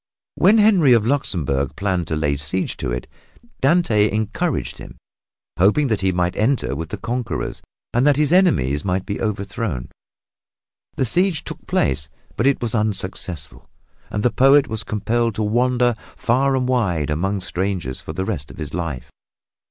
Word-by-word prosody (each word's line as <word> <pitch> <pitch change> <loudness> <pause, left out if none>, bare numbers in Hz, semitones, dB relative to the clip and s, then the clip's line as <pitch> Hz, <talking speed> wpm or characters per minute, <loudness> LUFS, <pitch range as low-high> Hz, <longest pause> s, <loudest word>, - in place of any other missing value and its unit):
When 210 +3 +4
Henry 195 - +5
of 115 -3 +3
Luxembourg 80 - -1
planned 95 -3 -1
to 80 - -2
lay 75 -2 0
siege 70 +7 -1
to - - -3
it, - - -3 0.5
Dante 130 -9 +3
encouraged 110 - -2
him, - - -11 0.6
hoping 110 +10 +4
that 110 -3 0
he 95 0 +2
might 90 0 0
enter 115 - +1
with 80 +2 -5
the - - -4
conquerors 120 +1 -3 0.3
and 125 +4 +3
that 145 - +5
his 150 +2 +2
enemies 75 - +3
might 95 0 -1
be 100 - -4
overthrown. 100 - -3 1.1
The 130 - +1
siege 175 - +2
took - - -8
place, 70 +2 0 0.3
but 115 - +1
it 140 -3 +1
was 115 0 -2
unsuccessful, 95 -8 -3 0.4
and 105 - -3
the 125 - +3
poet 135 +2 +5
was 110 -1 -2
compelled 115 +2 -1
to 110 - -1
wander 120 +3 +2 0.2
far 135 +3 +2
and 130 -1 0
wide 90 - 0
among 95 +6 -1
strangers 90 -8 -3
for 80 - -7
the 95 +4 -3
rest 75 -10 -4
of 65 - -12
his 75 -2 -6
life. 85 -7 -4
105 Hz, 165 wpm, -21 LUFS, 85-125 Hz, 1.1 s, Henry